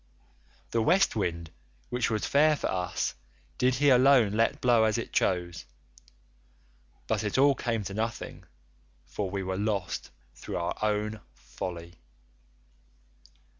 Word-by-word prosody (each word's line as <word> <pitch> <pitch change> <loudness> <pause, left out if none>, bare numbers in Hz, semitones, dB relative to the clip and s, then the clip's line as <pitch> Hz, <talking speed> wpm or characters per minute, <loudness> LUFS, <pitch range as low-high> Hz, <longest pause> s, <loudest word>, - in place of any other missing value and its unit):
The 115 - +1
West 185 +8 +3
wind 85 -5 -2 0.4
which 125 0 0
was 110 -2 -1
fair 150 +2 +4
for - - -3
us 90 -1 -2 0.5
did 125 0 +3
he 145 +3 +3
alone 125 -4 +5
let 115 +2 +1
blow 120 -3 +4
as 110 -1 +1
it - - -5
chose; 85 -5 0 1.4
but - - -1
it 105 +2 -1
all 140 +1 +5
came 115 -4 -2
to 100 - -6
nothing, 110 +2 -4 0.6
for 100 -2 -4
we 95 +1 -3
were 95 0 -3
lost 100 -3 -2 0.2
through - - -6
our 85 -1 -2
own 105 0 -1 0.2
folly. 85 +8 -8
110 Hz, 130 wpm, -28 LUFS, 90-125 Hz, 1.4 s, alone